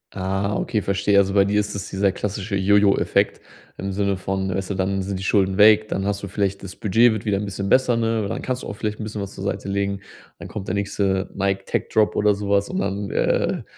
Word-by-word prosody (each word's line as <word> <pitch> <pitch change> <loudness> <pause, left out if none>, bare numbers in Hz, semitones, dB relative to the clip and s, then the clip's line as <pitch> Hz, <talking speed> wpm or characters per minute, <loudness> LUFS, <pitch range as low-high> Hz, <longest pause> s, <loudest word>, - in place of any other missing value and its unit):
Ah, 95 +1 -1
okay, 105 -1 -1
verstehe. 100 +1 +1
Also, 100 0 +3
bei 100 -1 +5
dir 105 +1 +1
ist 105 0 -2
das 100 0 -5
dieser 95 0 +1
klassische 100 +1 -4
Jo-Jo-Effekt 100 +1 +2 0.4
im 95 0 -3
Sinne 100 0 0
von 95 +1 -2
weißt 95 -1 -3
du, 100 - -2
dann 95 +1 -1
sind 95 0 -3
die - - -6
Schulden 95 -1 +2
weg, 110 +1 +6
dann 95 - -2
hast 100 0 -1
du 100 - -5
vielleicht 100 0 -2
das 95 -1 -8
Budget 115 +4 +4
wird 110 -1 -4
wieder 100 -2 +1
'n 105 - -3
bisschen 100 0 -4
besser, 125 -1 +3
ne? 115 -2 0
Dann - - -4
kannst 130 0 -2
du - - -7
auch - - -5
vielleicht 105 +1 -4
'n - - -4
bisschen 105 0 -5
was 100 - -8
zur 95 - -8
Seite 100 - -3
legen. 100 0 -1 0.4
Dann - - -9
kommt 105 -3 -7
der 95 - -1
nächste 100 -1 -1
„Nike 95 0 -1
Tech-Drop“ 110 -1 +1
oder 105 -1 +3
sowas 100 0 0
und 185 - -3
dann, 100 - -2
äh, - - 0
100 Hz, 240 wpm, -22 LUFS, 95-105 Hz, 0.4 s, weg